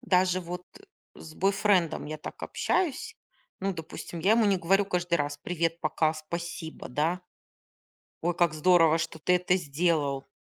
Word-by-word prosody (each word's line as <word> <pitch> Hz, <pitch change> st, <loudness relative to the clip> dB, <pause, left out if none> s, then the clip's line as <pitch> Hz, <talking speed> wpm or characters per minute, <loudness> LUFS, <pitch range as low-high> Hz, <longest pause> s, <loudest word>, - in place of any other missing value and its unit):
даже 185 Hz, -5 st, +2 dB
вот 180 Hz, +1 st, -6 dB, 0.5 s
с 155 Hz, -, -11 dB
бойфрендом 195 Hz, -4 st, +2 dB
я 155 Hz, -, -4 dB
так 150 Hz, -, -9 dB
общаюсь. 380 Hz, -, -1 dB, 0.4 s
Ну, 195 Hz, +1 st, 0 dB
допустим, 165 Hz, +1 st, -7 dB
я 195 Hz, +6 st, +4 dB
ему 230 Hz, 0 st, +4 dB
не 195 Hz, -1 st, +3 dB
говорю 195 Hz, +3 st, +2 dB
каждый 175 Hz, -2 st, 0 dB
раз: 145 Hz, -2 st, -2 dB
"Привет, 165 Hz, -1 st, -1 dB
пока, 155 Hz, 0 st, +1 dB
спасибо, 165 Hz, +1 st, -6 dB
да. 160 Hz, +7 st, 0 dB, 1.0 s
Ой, 175 Hz, +2 st, +1 dB
как 170 Hz, -3 st, +2 dB
здорово, 165 Hz, 0 st, +5 dB
что 165 Hz, -1 st, -4 dB
ты 180 Hz, +3 st, +2 dB
это 180 Hz, 0 st, +2 dB
сделал". 150 Hz, -4 st, 0 dB
170 Hz, 150 wpm, -28 LUFS, 160-185 Hz, 1.0 s, здорово